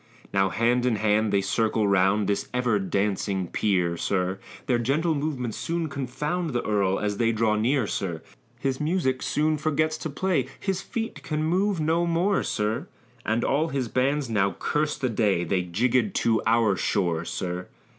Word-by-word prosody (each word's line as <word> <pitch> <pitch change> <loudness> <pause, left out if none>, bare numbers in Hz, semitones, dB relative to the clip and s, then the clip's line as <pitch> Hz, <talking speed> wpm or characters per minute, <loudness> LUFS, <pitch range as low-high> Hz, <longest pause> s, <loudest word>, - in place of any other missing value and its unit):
Now 95 0 +3
hand 120 +4 +2
in 120 - +2
hand 105 0 +2
they 100 -1 +3
circle 110 +2 +1
round 100 +2 +3
This 100 +1 -1
ever 120 -4 +2
dancing 95 -1 -1
peer, 90 -2 0
sir; 95 +1 -1 0.3
Their 120 -2 +2
gentle 150 +8 +1
movements 140 -6 -3
soon 165 -1 -2
confound 150 +4 -3
The 120 - -1
earl 100 -3 +1
as 105 -1 -1
they 115 -1 +2
draw 110 -1 +1
near, 120 +3 +2
sir. 85 -5 -3 0.3
His 130 +1 -2
music 150 -5 0
soon 155 +1 +1
forgets 155 +1 0
to 160 - -4
play 150 -3 0
His 190 -2 -2
feet 225 +3 -5
can 155 0 -2
move 185 +3 +1
no 165 +3 +1
more, 175 +4 +2
sir, 105 +1 -1 0.4
And 115 +2 +1
all 150 +4 +1
his 135 -6 -2
bands 135 +3 +1
now 100 -4 +1
curse 150 0 0
the 130 - -1
day 105 -6 +1
They 90 +2 0
jiggèd 115 +4 +1
to 115 -1 +2
our 110 -3 +3
shore, 85 -4 0
sir. 90 +1 -4
115 Hz, 170 wpm, -26 LUFS, 100-150 Hz, 0.4 s, Now